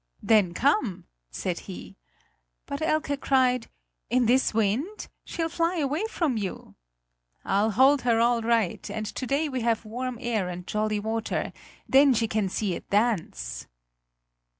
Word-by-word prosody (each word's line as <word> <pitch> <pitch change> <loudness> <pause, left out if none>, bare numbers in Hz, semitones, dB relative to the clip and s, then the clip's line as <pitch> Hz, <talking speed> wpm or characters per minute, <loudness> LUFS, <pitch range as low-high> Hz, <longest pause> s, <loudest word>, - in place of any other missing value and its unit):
"Then 200 -6 +3
come!" 255 -8 +1 0.2
said - - -3
he. - - -8 0.7
But 280 +2 -5
Elke 310 -3 0
cried: 255 -3 +2 0.4
"In 250 0 +3
this 255 +3 +3
wind? 225 - -1 0.2
She'll 330 -1 -2
fly 335 +2 0
away 300 +6 0
from 310 - 0
you!" 200 -3 -5 0.7
"I'll 205 +3 +2
hold 265 +6 +4
her 235 -2 +2
all 235 0 +3
right; 225 -5 0
and 215 -1 -4
to 255 +4 -5
day 285 +4 +1
we 260 -3 -3
have 230 -1 0
warm 245 +3 -4
air 225 -7 -1
and 180 0 -6
jolly 215 +1 -1
water; 220 +1 -2 0.3
then 270 -1 +6
she 225 0 +1
can 215 -3 0
see 195 0 -1
it - - -8
dance!" 165 - -1
235 Hz, 150 wpm, -26 LUFS, 215-270 Hz, 0.7 s, then